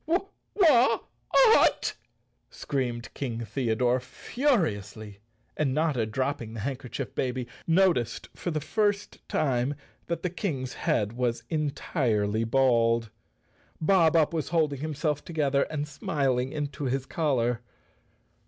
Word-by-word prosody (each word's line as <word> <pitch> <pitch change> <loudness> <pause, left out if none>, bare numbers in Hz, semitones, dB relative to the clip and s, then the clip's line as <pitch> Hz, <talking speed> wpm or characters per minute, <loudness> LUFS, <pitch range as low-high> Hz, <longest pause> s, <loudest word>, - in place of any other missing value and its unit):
" 400 - -31
"Wh—at!" 335 - +4 0.6
screamed 120 -4 -3
King 120 -4 -4
Theodore 120 +2 +1
furiously, 110 - -2 0.4
and 135 -3 0
Notta, 150 -8 +1
dropping 120 -1 -2
the 110 - -5
handkerchief 130 +1 -4
baby, 125 -1 -2 0.2
noticed 170 -8 +2
for - - -4
the 155 -2 -1
first 205 +5 -1
time 130 -1 0 0.3
that 170 - -3
the 180 - -1
King's 135 - -3
head 105 +1 0
was 120 -1 -1
entirely 120 - 0
bald. 115 -2 +2 0.7
Bob 165 -1 +4
Up 160 0 +3
was 160 -2 -2
holding 155 -5 +1
himself 150 -1 -2
together 145 -4 0
and 150 -1 -3
smiling 135 -3 -1
into 145 -2 -4
his 130 +1 -1
collar. 125 -8 0
135 Hz, 115 wpm, -27 LUFS, 120-155 Hz, 0.7 s, Wh—at